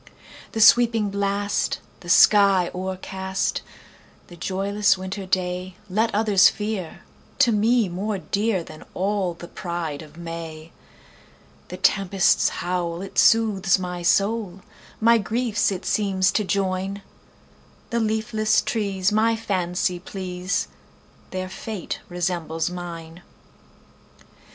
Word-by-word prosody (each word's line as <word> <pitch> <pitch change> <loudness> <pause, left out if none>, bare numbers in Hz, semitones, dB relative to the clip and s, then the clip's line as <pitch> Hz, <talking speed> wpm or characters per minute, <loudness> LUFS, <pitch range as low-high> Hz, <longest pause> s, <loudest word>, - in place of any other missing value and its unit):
"The 220 - -1
sweeping 225 -2 +5
blast, 200 0 -1 0.2
the 175 - -11
sky 195 -2 +5
o'ercast,"The 190 -1 -5
joyless 195 +4 +1
winter 190 +1 -6
dayLet 185 +4 -1
others 205 -3 +5
fear, 210 -5 -5 0.4
to 240 - +4
me 225 +1 +3
more 195 +4 -3
dearThan 190 -5 -2
all 190 -2 -1
the 175 - -10
pride 170 -5 -5
of 155 0 -14
May:The 165 -1 -11
tempest's 195 -1 +3 0.2
howl, 175 0 -2
it 195 - -2
soothes 210 -4 +4
my 180 -1 -5
soul, 200 +1 +1 0.4
My 230 +1 +5
griefs 220 0 0
it 190 0 -5
seems 190 -3 +1
to 215 - 0
join; 195 0 -2 0.9
The 235 - +1
leafless 220 -1 +1
trees 200 -3 0
my 225 +2 +3
fancy 180 -4 -1
please, 185 0 -3 0.6
Their 185 0 -4
fate 195 +1 -6
resembles 175 -2 -2
mine! 170 -1 -8
190 Hz, 105 wpm, -23 LUFS, 180-210 Hz, 0.9 s, sweeping